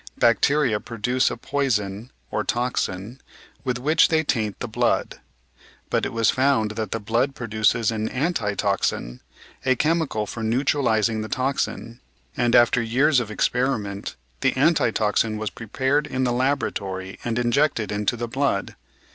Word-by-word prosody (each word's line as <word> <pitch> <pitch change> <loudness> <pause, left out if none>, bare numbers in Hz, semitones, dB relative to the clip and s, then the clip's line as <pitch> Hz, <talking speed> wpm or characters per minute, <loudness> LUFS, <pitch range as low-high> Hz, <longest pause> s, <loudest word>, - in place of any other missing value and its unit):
Bacteria 120 -1 +3
produce 125 +4 0
a - - -5
poison 115 -5 -1 0.2
(or - - -1
toacin) 120 -2 -2 0.4
with 125 -2 -1
which 155 +6 +4
they 160 -1 +2
taint 110 -8 -1
the - - -5
blood. - - 0 0.7
But - - +1
it - - -7
was 115 -1 +2
found 130 -5 +2
that 110 -1 -4
the 115 - -2
blood 120 +6 0
produces 110 0 +1
an 110 -1 -2
"anti 130 - -1
toxin," 95 - -1 0.4
a 130 -1 +3
chemical 155 -7 0
for 115 - -7
neutralising 115 -2 +1
the 110 - -6
toxin; 130 -3 -2 0.4
and 120 0 +2
after 120 0 +5
years 130 +5 +3
of 115 -4 -4
experiment 105 -2 -1 0.2
the - - +1
anti - - +3
toxin 110 -1 0
was 105 -2 -3
prepared 130 - -1
in 130 -2 -2
the 125 -1 +1
laboratory 100 -8 -2
and 115 -1 -2
injected 120 -1 +1
into 105 +3 -1
the 120 0 -3
blood. 130 -4 -1
120 Hz, 145 wpm, -23 LUFS, 110-130 Hz, 0.7 s, after